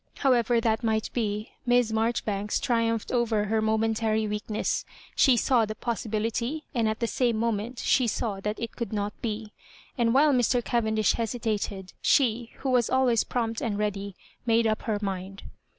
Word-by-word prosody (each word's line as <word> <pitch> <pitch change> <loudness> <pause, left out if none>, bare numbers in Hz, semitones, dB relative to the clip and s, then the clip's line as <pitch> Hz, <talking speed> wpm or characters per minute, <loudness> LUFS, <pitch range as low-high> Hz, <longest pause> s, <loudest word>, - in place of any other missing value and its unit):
However 240 -3 +3
that 225 0 0
might 220 -1 0
be. 215 -2 -2
Miss 245 -2 +3
Maijoribanks 220 -2 0
triupnphed 230 -2 0
over 230 -4 +1
her 220 +1 +1
momentary 220 0 +1
weakness. 210 +1 -2 0.3
She 260 -4 +5
saw 240 0 +3
the 215 0 -3
poasilMlity, 230 +6 -2
and 230 -4 +1
at 220 - -3
the 235 - 0
same 235 -1 +1
moment 230 +1 -1
she 250 0 +2
saw 210 -2 -2
that 210 +2 -3
it 230 -1 -5
could 235 -1 -4
not 205 0 -2
be; 215 -1 -4 0.5
and 230 -1 +3
while 285 +4 +5
Mr. 245 -1 +2
Caven 220 -2 0
dish 215 -3 +3
hesitated, 215 -4 -3
she, 240 -4 +2
who 270 - 0
was 245 -3 +3
always 255 -4 +3
prompt 230 -2 -2
and 210 -4 -1
ready, 200 -2 -2 0.3
made 230 -1 +3
up 215 -1 +1
her 215 -2 -1
mind. 195 0 -4
225 Hz, 165 wpm, -27 LUFS, 215-240 Hz, 0.5 s, She